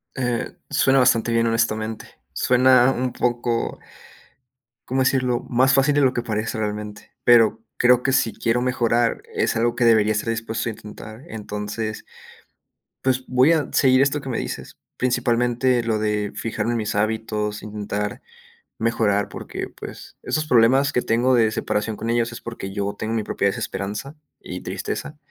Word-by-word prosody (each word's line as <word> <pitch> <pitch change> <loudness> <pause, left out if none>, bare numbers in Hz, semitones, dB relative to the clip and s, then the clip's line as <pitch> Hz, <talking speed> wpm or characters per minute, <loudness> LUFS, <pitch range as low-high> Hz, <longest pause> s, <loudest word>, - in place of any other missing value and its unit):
Eh, 125 -3 -2
suena 135 0 +3
bastante 120 -2 +3
bien, 115 0 +2
honestamente, 110 -1 -1 0.3
suena 125 0 +4
un 130 -1 -2
poco, 120 -1 -1 1.1
¿cómo 130 +1 -1
decirlo?, 130 -2 +1
más 130 +2 +3
fácil 135 +2 +3
de 145 - +3
lo 130 -1 +4
que - - -1
parece 110 -1 -3
realmente, 105 -1 -5
pero 115 -2 +5 0.2
creo 125 0 +5
que 135 - +1
si 115 -4 +1
quiero 115 +1 0
mejorar, 120 -2 +1
es - - 0
algo 120 +1 +1
que 120 - +2
debería 110 -2 +4
estar 105 +2 -2
dispuesto 115 0 -2
a - - -2
intentar, 110 +2 -11
entonces, 105 0 -5 1.0
pues, 130 -1 0
voy 130 +5 +4
a 155 -3 0
seguir 130 -1 +4
esto 140 +1 0
que 135 - -7
me 120 - -2
dices. - - -5 0.2
Principalmente, 125 0 +1
lo 115 -1 0
de 105 -1 -1
fijarme 115 0 -2
en - - 0
mis 110 -2 -2
hábitos, 105 0 -1
intentar 105 -1 -4 0.6
mejorar 110 -3 +1
porque, - - -6
pues, - - -10
esos 155 0 -1
problemas 130 +3 +4
que 125 - +2
tengo 120 +3 +2
de 115 -3 +4
separación 110 0 -2
con 115 - -5
ellos 115 0 +1
es - - -8
porque 115 -4 -7
yo 100 0 -2
tengo 110 +1 -2
mi 110 -2 0
propia 100 - 0
desesperanza 105 +7 -4 0.3
y - - -6
tristeza, 150 - -5
115 Hz, 160 wpm, -22 LUFS, 110-125 Hz, 1.1 s, pero